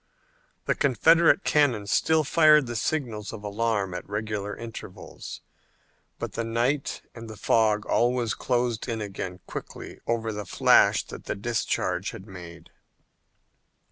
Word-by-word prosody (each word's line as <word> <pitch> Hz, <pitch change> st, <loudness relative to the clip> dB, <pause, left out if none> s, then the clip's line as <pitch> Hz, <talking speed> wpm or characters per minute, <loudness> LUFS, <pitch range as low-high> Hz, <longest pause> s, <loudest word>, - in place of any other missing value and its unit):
The -, -, +2 dB
Confederate 165 Hz, +7 st, +4 dB
cannon 130 Hz, -9 st, +2 dB
still 155 Hz, +10 st, +2 dB
fired 150 Hz, 0 st, +5 dB
the 120 Hz, -1 st, -5 dB
signals 115 Hz, -5 st, -2 dB
of 110 Hz, -2 st, -9 dB
alarm 105 Hz, -2 st, -1 dB
at 90 Hz, -, -7 dB
regular 105 Hz, -1 st, -3 dB
intervals, 115 Hz, -1 st, -9 dB, 0.8 s
but -, -, -5 dB
the 115 Hz, -, -2 dB
night 120 Hz, +5 st, -1 dB
and 115 Hz, -1 st, -9 dB
the 110 Hz, -, -9 dB
fog 105 Hz, -1 st, +2 dB
always 120 Hz, -1 st, +1 dB
closed 120 Hz, -2 st, -1 dB
in 115 Hz, -1 st, -2 dB
again 95 Hz, -3 st, -6 dB
quickly -, -, -8 dB
over 115 Hz, -1 st, -1 dB
the 105 Hz, 0 st, -4 dB
flash -, -, +4 dB
that -, -, -10 dB
the -, -, -3 dB
discharge 115 Hz, +3 st, -1 dB
had 95 Hz, -, -9 dB
made. 90 Hz, -4 st, -11 dB
115 Hz, 135 wpm, -26 LUFS, 105-125 Hz, 0.8 s, fired